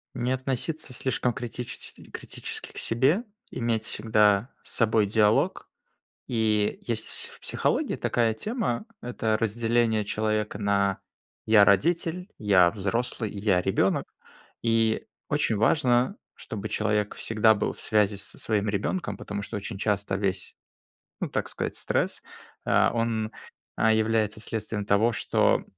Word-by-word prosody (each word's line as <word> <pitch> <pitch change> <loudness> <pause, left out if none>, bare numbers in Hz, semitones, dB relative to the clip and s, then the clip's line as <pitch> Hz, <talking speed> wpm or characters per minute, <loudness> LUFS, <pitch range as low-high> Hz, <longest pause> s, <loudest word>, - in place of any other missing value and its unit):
Не 125 +1 -1
относиться 130 +2 -2
слишком 125 -1 0
критичес 125 -1 -6 0.2
критически - - -7
к - - -14
себе, 135 - +2 0.3
иметь 115 -2 -1
всегда 105 +1 +3
с - - -9
собой 110 -2 +3
диалог. 105 0 +2 0.6
И 110 -3 +1
есть 110 -2 -2
в - - -8 0.2
с - - -15
в - - -28
психологии - - 0
такая 115 -2 +1
тема- 215 - -2 0.2
это 110 -3 -1
разделение 115 -1 +1
человека 110 -1 -1
на 100 -1 +1 0.5
"я- 105 -2 +7
родитель", 170 - +2
"я- 95 -6 +5
взрослый" 110 +2 -2
и 100 - -6
"я- 100 -3 +3
ребенок". 95 - +1 0.6
И 115 -1 +1 0.2
очень 110 - +1
важно, 125 - +3 0.2
чтобы 110 -1 -6
человек 105 -1 0
всегда 110 0 +3
был 100 - -1
в - - -14
связи 105 -1 +2
со 100 - -7
своим 105 -1 0
ребенком, 105 - -2
потому 100 0 -5
что 100 - -5
очень 100 0 -6
часто 100 -2 0
весь, 95 -2 -2 0.7
ну, - - -1
так - - -2
сказать, - - -3
стресс, - - -1 0.4
а, - - +3
он, 115 -1 -1 0.4
а, 110 0 +4
является 110 -1 +1
следствием 110 -2 -3
того, 110 +4 +4
что - - +2
110 Hz, 135 wpm, -27 LUFS, 105-120 Hz, 0.7 s, я